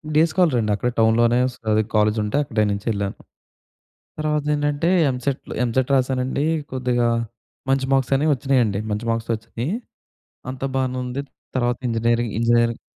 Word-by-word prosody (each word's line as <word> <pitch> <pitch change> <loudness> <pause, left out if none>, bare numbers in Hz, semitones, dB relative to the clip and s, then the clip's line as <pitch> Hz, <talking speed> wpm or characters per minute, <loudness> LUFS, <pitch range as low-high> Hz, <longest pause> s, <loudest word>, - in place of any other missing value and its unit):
Day 155 - +6
స్కాలరే 170 -7 +3
అండి. 105 - 0
అక్కడే 120 +4 -1
టౌన్‌లోనే 115 +2 +4
స్ - - -15 0.2
అదే 110 0 +3
కాలేజ్ 105 +1 +3
ఉంటే 105 +7 -1
అక్కడే 110 -5 0
నుంచి 100 +2 -4
ఎళ్ళాను. 100 -1 -3 1.0
తర్వాత 150 -1 0
ఏంటంటే 145 +2 0 0.2
ఎంసెట్‌లు 130 +1 -3
ఎంసెట్ 125 +2 0
రాసానండి. 130 +2 0 0.3
కొద్దిగా 125 -2 0 0.6
మంచి 135 0 +2
మార్క్స్ 135 -1 +1
అనేవి 150 +3 +2
వచ్చినాయండి. 125 -6 +1
మంచి 105 +3 -2
మార్క్స్ 115 0 -3
వచ్చినాయి. 115 +6 -5 0.8
అంతా 130 +1 -5
బానే 130 -1 -1
ఉంది. 130 +3 -4 0.3
తర్వాత 120 -1 +1
ఇంజినీరింగ్, 115 0 0
ఇంజినీరింగ్ 115 0 +2
125 Hz, 145 wpm, -22 LUFS, 115-135 Hz, 1.0 s, Day